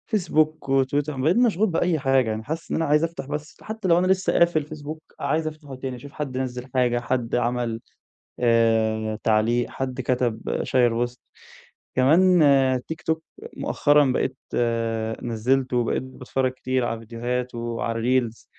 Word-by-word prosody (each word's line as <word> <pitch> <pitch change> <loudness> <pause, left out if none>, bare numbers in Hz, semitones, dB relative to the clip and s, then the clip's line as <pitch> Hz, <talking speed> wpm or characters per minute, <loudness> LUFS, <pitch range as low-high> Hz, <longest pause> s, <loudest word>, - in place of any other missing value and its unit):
Facebook 155 -4 +2
وTwitter، 135 +2 +1
وبقيت 150 - +1
مشغول 220 -4 +3
بأي 165 -1 +1
حاجة، 135 -4 +2
يعني 110 0 -3
حاسس 160 +5 -5
إن - - +1
أنا 165 - +1
عايز 150 +2 +3
أفتح 165 -5 -3
بس، 150 +1 -6
حتى 220 -2 -4
لو 170 - +5
أنا 185 - +1
لسه 190 0 +2
قافل 170 -3 +3
Facebook 155 0 -7 0.2
عايز 155 +2 0
أفتحه 150 -3 -8
تاني، 130 0 -5
أشوف 140 +3 -11
حد 135 -5 -5
نَزل 125 -1 -3
حاجة، 120 -1 +2
حد 125 -1 -1
عمل، 120 -1 -1 0.6
آآ 110 -2 +2
تعليق، 115 +2 +2
حد 130 -1 -4
كتب، 125 -3 -1
شيّر 120 -1 +2
post. 120 - -13 0.8
كمان 170 +8 +5 0.5
TikTok 160 0 -2 0.4
مؤخرًا 145 0 +3
بقيت 130 +1 -1 0.9
نزلته 125 +2 0
وبقيت 120 +1 0
باتفرج 130 0 -2
كتير 130 -1 -1
على 115 -1 -3
فيديوهات 120 +2 -4
وعلى 115 +2 0
الReels، 115 - -19
130 Hz, 150 wpm, -24 LUFS, 120-155 Hz, 0.9 s, لو